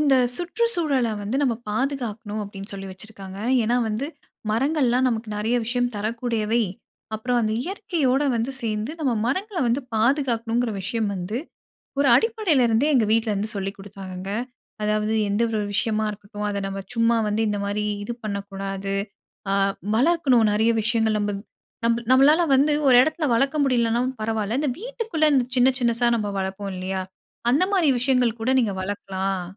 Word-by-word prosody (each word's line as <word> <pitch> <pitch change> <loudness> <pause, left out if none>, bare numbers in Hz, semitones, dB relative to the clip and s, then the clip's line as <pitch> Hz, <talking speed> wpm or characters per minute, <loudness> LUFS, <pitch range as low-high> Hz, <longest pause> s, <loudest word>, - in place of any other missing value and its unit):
இந்த 280 -3 +4 0.2
சுற்றுச்சூழல 340 - 0
வந்து 220 +6 -2
நம்ம 245 -4 +2
பாதுகாக்கணும் 225 -3 -2
அப்டீன்னு 200 0 -8
சொல்லி 195 0 -6
வச்சிருக்காங்க. 195 0 -10 0.2
ஏன்னா 235 +3 +1
வந்து, 220 +6 -2 0.4
மரங்கள்லாம் 260 +1 +2
நமக்கு 230 -1 -3
நறைய 225 +4 0
விஷயம் 245 +1 0
தரக்கூடியவை. 230 +1 -1 0.5
அப்றம் 245 +3 0
அந்த 215 - 0
இயற்கையோட 330 -8 0
வந்து 230 +3 -1
சேர்ந்து, 220 +4 -2
நம்ம 270 -5 +1
மரங்கள 375 - -2
வந்து 240 +4 +1
பாதுகாக்கணும்ங்கற 235 -1 +1
விஷயம் 220 +2 -1
வந்து 190 +5 -3 0.6
ஒரு 280 - +4
அடிப்படைல 425 - +2
இருந்தே 230 +6 +2
எங்க 225 -4 +4
வீட்லருந்து 215 -2 0
சொல்லிக்குடுத்தாங்கங்க. 195 -1 -6 0.5
அதாவது 215 +1 +1 0.2
எந்த 205 +3 +1
ஒரு 215 -2 -1
விஷயமா 215 +1 +1
இருக்கட்டும், 205 0 -7
அத 200 -1 -2
நம்ம 195 0 -4
சும்மா 230 0 +3
வந்து 210 +1 0
இந்த 205 - -1
மாரி 205 +1 -1 0.2
இது 235 - -4
பண்ணக்கூடாது. 195 -1 -4 0.6
அ - - +2 0.4
வளர்க்கணும் 265 -4 +4
நறைய 220 +2 +3
விஷயங்கள் 220 -1 +1
நம்ம 205 0 -1 0.5
நம் 230 0 +3 0.2
நம்மளால 285 +6 +6
வந்து 290 +3 +4 0.2
ஒரு 250 - +7
எடத்துல 315 +2 -1
வளர்க்க 275 +5 +1
முடியலனாலும் 245 0 +1
பரவால்ல, 220 +1 -1
இந்த 295 - +1
வீட்டுக்குள்ள 455 -10 -1
இந்த 260 -2 +4
சின்ன, 250 +2 +6
சின்னசா 235 0 +2
நம்ம 210 - -2
வளர்ப்போம் 195 +1 -4
இல்லையா? 190 +1 -3 0.5
அந்த 280 +8 +4
மாரி 355 -7 +3
விஷயங்கள் 250 -3 +2
கூட 245 +3 +1
நீங்க 220 -5 +1
வளர்க்கலாம். 195 -1 -3
230 Hz, 145 wpm, -24 LUFS, 205-265 Hz, 0.6 s, ஒரு